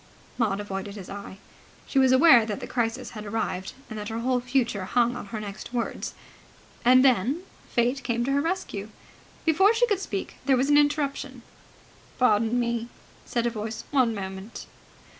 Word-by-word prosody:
Maud 205 Hz, -4 st, +1 dB
avoided 200 Hz, 0 st, -5 dB
his 195 Hz, -3 st, -9 dB
eye. 200 Hz, -1 st, -8 dB, 0.5 s
She 275 Hz, -, +1 dB
was 260 Hz, -1 st, +5 dB
aware 260 Hz, -3 st, +7 dB
that 215 Hz, -2 st, -4 dB
the -, -, -6 dB
crisis 240 Hz, +1 st, -2 dB
had 215 Hz, -2 st, -7 dB
arrived, 205 Hz, -3 st, -3 dB
and 220 Hz, -1 st, -6 dB
that 210 Hz, +1 st, -5 dB
her 225 Hz, +1 st, -3 dB
whole 250 Hz, +1 st, +1 dB
future 245 Hz, -6 st, 0 dB
hung 240 Hz, +3 st, +2 dB
on 245 Hz, -, -7 dB
her 220 Hz, +1 st, -5 dB
next 210 Hz, +3 st, -8 dB
words. 235 Hz, -, -3 dB, 0.7 s
And 255 Hz, +2 st, +6 dB
then 260 Hz, -, +2 dB, 0.3 s
Fate 245 Hz, +3 st, +1 dB
came 235 Hz, 0 st, 0 dB
to 275 Hz, -, 0 dB
her 280 Hz, +1 st, +2 dB
rescue. 285 Hz, -, -3 dB, 0.6 s
Before 385 Hz, +7 st, +4 dB
she 485 Hz, +2 st, +4 dB
could 410 Hz, -5 st, 0 dB
speak, 200 Hz, -, -5 dB
there 270 Hz, -2 st, +5 dB
was 270 Hz, +3 st, +2 dB
an 290 Hz, -, +6 dB
interruption. 285 Hz, -3 st, -1 dB, 0.7 s
"Pardon 230 Hz, 0 st, +3 dB
me," 235 Hz, -1 st, -1 dB, 0.4 s
said 235 Hz, -1 st, -1 dB
a 240 Hz, -, +1 dB
voice. 220 Hz, 0 st, -5 dB
"One 255 Hz, -6 st, +3 dB
moment!" 190 Hz, +2 st, -7 dB
235 Hz, 175 wpm, -26 LUFS, 210-265 Hz, 0.7 s, aware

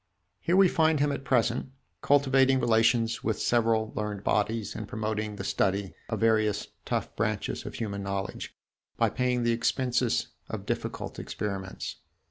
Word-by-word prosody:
Here 175 Hz, +2 st, +1 dB
we 195 Hz, 0 st, +7 dB
find 160 Hz, -3 st, +3 dB
him 145 Hz, 0 st, +2 dB
at 140 Hz, -, -4 dB
present, 125 Hz, 0 st, +1 dB, 0.3 s
cultivating 135 Hz, -2 st, +4 dB
relations 115 Hz, -1 st, +2 dB
with 110 Hz, -1 st, 0 dB
several 115 Hz, -2 st, +2 dB
learned 105 Hz, -2 st, -3 dB
bodies 110 Hz, +1 st, 0 dB
and 110 Hz, -, -5 dB
promoting 110 Hz, -1 st, -2 dB
the -, -, -6 dB
study 100 Hz, 0 st, 0 dB, 0.2 s
of -, -, -2 dB
various 110 Hz, -2 st, +2 dB, 0.2 s
tough -, -, -2 dB
branches 110 Hz, -2 st, -2 dB
of -, -, -7 dB
human 100 Hz, -3 st, -3 dB
knowledge, 100 Hz, 0 st, -4 dB, 0.4 s
by -, -, +2 dB
paying 125 Hz, -1 st, 0 dB
the 120 Hz, -, +3 dB
expenses 120 Hz, 0 st, +1 dB, 0.2 s
of -, -, -5 dB
difficult -, -, -4 dB
experiments. 95 Hz, -2 st, -4 dB
115 Hz, 145 wpm, -28 LUFS, 105-125 Hz, 0.4 s, we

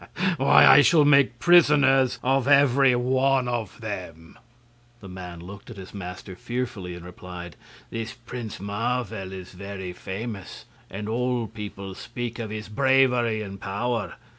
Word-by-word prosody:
"Why, 135 Hz, -, +6 dB
I 145 Hz, -, +9 dB
shall 155 Hz, 0 st, +5 dB
make 140 Hz, -4 st, +4 dB
prisoners 140 Hz, -6 st, +5 dB
of 135 Hz, 0 st, +1 dB
every 140 Hz, -2 st, +5 dB
one 130 Hz, +1 st, +1 dB
of 120 Hz, -5 st, -4 dB
them!" 90 Hz, -7 st, -7 dB, 0.6 s
The 100 Hz, -, -11 dB
man 90 Hz, -2 st, -8 dB
looked 100 Hz, +5 st, -11 dB
at 115 Hz, -, -10 dB
his 95 Hz, -1 st, -10 dB
master 90 Hz, -1 st, -8 dB
fearfully, 110 Hz, -6 st, -5 dB
and 90 Hz, 0 st, -10 dB
replied: 90 Hz, -1 st, -9 dB, 0.4 s
"This 115 Hz, +2 st, -5 dB
Prince 115 Hz, -2 st, -8 dB
Marvel 105 Hz, -1 st, -3 dB
is 95 Hz, -1 st, -9 dB
very 95 Hz, -1 st, -7 dB
famous, 100 Hz, +1 st, -7 dB, 0.2 s
and 105 Hz, +2 st, -6 dB
all 120 Hz, +1 st, -1 dB
people 100 Hz, -3 st, -8 dB
speak 120 Hz, +3 st, -6 dB
of 110 Hz, -2 st, -4 dB
his 110 Hz, 0 st, -6 dB
bravery 125 Hz, -2 st, +2 dB
and 100 Hz, -1 st, -9 dB
power. 105 Hz, 0 st, -2 dB
110 Hz, 140 wpm, -25 LUFS, 95-125 Hz, 0.6 s, I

